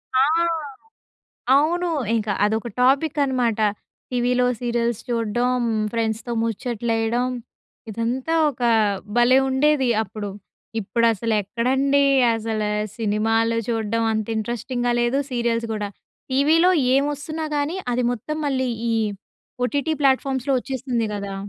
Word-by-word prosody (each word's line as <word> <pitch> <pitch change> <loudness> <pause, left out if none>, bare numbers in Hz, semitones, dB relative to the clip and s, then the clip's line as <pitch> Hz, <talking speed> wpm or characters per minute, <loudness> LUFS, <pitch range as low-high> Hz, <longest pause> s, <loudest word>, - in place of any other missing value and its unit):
ఆ! 260 - +5 1.3
అవును. 345 +5 +2 0.3
ఇంక 215 -1 -1 0.2
అదొక 220 +3 -1
టాపిక్ 275 +4 +3
అనమాట. 245 -5 0 0.5
టీవీలో 250 0 +1 0.2
సీరియల్స్ 235 -2 -1
చూడడం, 240 +2 0 0.3
ఫ్రెండ్స్‌తో 225 +1 -2
ముచ్చట్లేయడం 230 +1 -1 0.6
ఇదంతా 240 +8 -2 0.2
ఒక 250 -3 -10 0.6
భలే 245 +2 +5
ఉండేది 265 -1 +2
అప్పుడు. 205 0 -6 0.5
ఇప్పుడసలెక్కడండి 230 +6 +1 0.3
అసల 220 -1 -2 0.4
సినిమాలు 225 +1 +1
చూడడం 225 0 0
అంత 215 0 -2
ఇంట్రెస్టింగ్‍గా 240 +2 -2
లేదు, 240 +3 +1
సీరియల్స్ 235 -1 0
కూడా. 205 -1 -3 0.4
టీవీలో 320 +7 +4 0.2
ఏం 275 - +3
వస్తున్నా 310 +3 -5
కానీ 300 +6 -1 0.2
అది 250 - 0
మొత్తం 305 +7 -4
మళ్ళీ 260 -2 0 0.2
ఈ - - +1 0.7
ఓటీటీ 285 +4 -1
ప్లాట్‍ఫామ్స్‌లో 270 0 +2
వచ్చేస్తుంది 255 -4 -2
కదా! 200 -1 -5
240 Hz, 105 wpm, -22 LUFS, 225-265 Hz, 1.3 s, ఆ